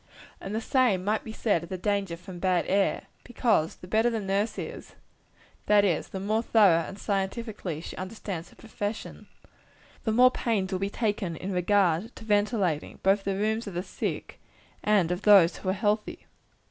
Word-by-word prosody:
And 195 +2 -5
the 220 - -1
same 230 -7 +2
might 215 +2 0
be 220 - -7
said 210 -6 0
of 170 - -10
the 185 - -4
danger 195 -2 -1
from 180 +1 -10
bad 180 -1 +1
air; 195 +1 +1 0.2
because, 220 -9 +1
the 180 - -13
better 220 +5 +3
the 230 -2 -2
nurse 200 +2 -1
is - - -7 0.7
that 205 -1 +5
is, 170 -6 0
the 190 - -6
more 215 +3 0
thoroughly 200 -8 +4
and 195 - -8
scientifically 200 -4 -3
she - - -8
understands 185 -3 -6
her - - -20
profession 215 -1 -6 0.8
the 220 - 0
more 250 +3 +6
pains 210 -7 -1
will 185 - -1
be 195 +1 -1
taken 205 -5 -2
in 185 +5 -5
regard 185 +2 +1
to - - -11
ventilating, 205 -6 0
both 195 +1 +3
the 195 -1 0
rooms 220 +3 -1
of 195 - -7
the 175 - -2
sick 185 - -5 0.4
and 200 -5 +3
of 180 +2 -2
those 195 -5 +6
who 185 - -4
are - - +2
healthy. 210 +1 -1
200 Hz, 185 wpm, -27 LUFS, 185-215 Hz, 0.8 s, more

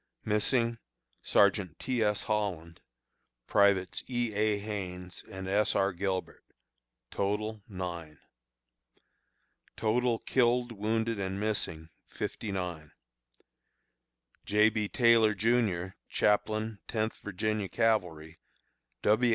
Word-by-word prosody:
Missing: 115 +2 +1 0.4
Sergeant 100 -5 +3
T. 125 -3 -1
S. 105 -1 +1
Holland; 95 -6 -2 0.7
Privates 100 -2 +2
E. 120 -3 -1
A. 105 0 +2
Haines 90 -4 -6
and 95 0 -6
S. 105 +2 +2
R. 95 0 +2
Gilbert. 95 +1 -3 0.7
Total, 105 +2 -2
9. 85 -5 -6 1.6
Total 115 +2 +1
killed, 120 0 +1
wounded, 110 +1 -1
and 95 0 -3
missing, 85 -7 -1 0.2
59. 90 -7 -5 1.5
J. 105 +1 +4
B. 105 -1 -1
TAYLOR, 115 -2 +4
JR., 100 -4 +1
Chaplain 110 +1 +1
Tenth 110 -1 -2
Virginia 105 0 -2
Cavalry, 85 -8 0 0.6
W. 110 +4 +4
105 Hz, 95 wpm, -30 LUFS, 95-110 Hz, 1.6 s, J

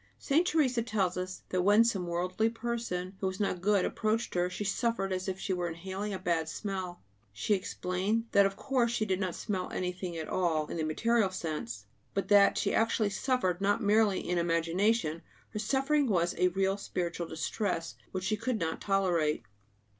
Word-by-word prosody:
Saint 320 +5 +2
Teresa 265 -8 +2
tells 200 -6 0
us 185 0 -5
that 185 - +1
when 205 +4 +6
some 195 -6 0
worldly 180 +6 0
person 225 -6 -3
who 190 - 0
was 190 +1 -4
not 190 -3 -1
good 200 -1 +3
approached 220 +1 -1
her, 180 0 +1
she 185 - -4
suffered 205 -1 0
as 185 +1 -3
if 190 0 -3
she 195 - -1
were 175 -1 -1
inhaling 190 +5 -4
a 195 - -2
bad 165 -3 0
smell. 185 - -4 0.3
She 105 - 0
explained 195 +3 -1
that 200 -1 +6
of 195 - -6
course 250 -1 +1
she 220 -2 0
did 190 -2 0
not 185 -4 -2
smell 190 -4 -3
anything 180 -1 -3
at 160 - -4
all, 165 -4 +1
in - - -5
the 160 - -1
material 220 +7 +2
sense; 150 - -4 0.3
but 195 - -1
that 200 -1 +6
she - - +1
actually 225 -2 +2
suffered, 195 -5 0
not 205 +2 +2
merely 210 -1 +3
in 175 0 +1
imagination; 170 +2 +1 0.3
her 210 - -5
suffering 270 +6 +2
was 175 -5 +2
a 180 - +5
real 195 +2 +1
spiritual 175 -3 -3
distress 165 +1 -2 0.2
which 185 -1 -3
she 215 - +1
could 230 +3 -1
not 160 -4 -2
tolerate. 175 - +1
190 Hz, 185 wpm, -31 LUFS, 175-215 Hz, 0.3 s, when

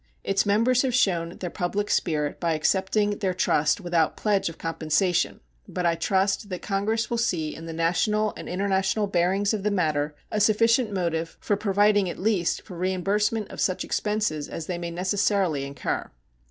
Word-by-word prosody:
Its 195 +1 +1
members 230 +5 +3
have 255 -3 0
shown 170 -8 +1
their 180 - -4
public 200 +4 -2
spirit 150 -4 0
by 170 -2 +1
accepting 195 +6 +1
their 190 -4 -1
trust 150 -3 +2
without 175 -4 0
pledge 200 -4 +1
of 165 - -11
compensation, 165 - 0 0.3
but 180 - -3
I 170 - +4
trust 195 +4 0
that 180 -2 -5
Congress 215 +3 -1
will 235 - 0
see 165 -9 0
in 165 +1 -9
the - - -5
national 205 +6 +1
and - - -8
international 195 +2 0
bearings 195 +2 +1
of 215 - -2
the 210 - +1
matter 155 -6 0 0.2
a 215 - 0
sufficient 230 +2 +3
motive 165 -3 -2
for 205 - 0
providing 205 -1 +2
at - - -6
least 190 -4 0
for 185 - -10
reimbursement 200 +4 0
of - - -5
such 185 - 0
expenses 210 -9 -1
as 165 - -5
they 175 0 -4
may 170 -1 -4
necessarily 185 -4 0
incur. 140 0 -3
190 Hz, 175 wpm, -25 LUFS, 170-210 Hz, 0.3 s, I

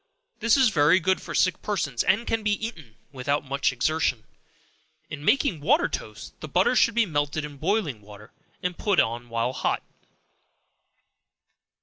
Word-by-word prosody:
This 230 +3 +3
is 260 -3 +5
very 165 0 +4
good 185 +2 0
for - - -7
sick 185 - +2
persons, 160 - -1
and 225 +5 +2
can 225 - -1
be 210 -1 +1
eaten 170 - -6 0.2
without 140 +2 -2
much 140 0 0
exertion. 125 -2 0 0.9
In 145 - -6
making 230 - +2
water 295 - +3
toast, - - -7
the - - -7
butter 255 - +2
should 230 -2 +3
be 235 -1 +4
melted 145 -2 -2
in 145 -1 -10
boiling 160 - -1
water, 105 +2 -14 0.3
and 180 -1 -1
put 200 -1 +1
on 120 +1 0
while 115 +2 -1
hot. - - -1
155 Hz, 155 wpm, -25 LUFS, 130-210 Hz, 0.9 s, is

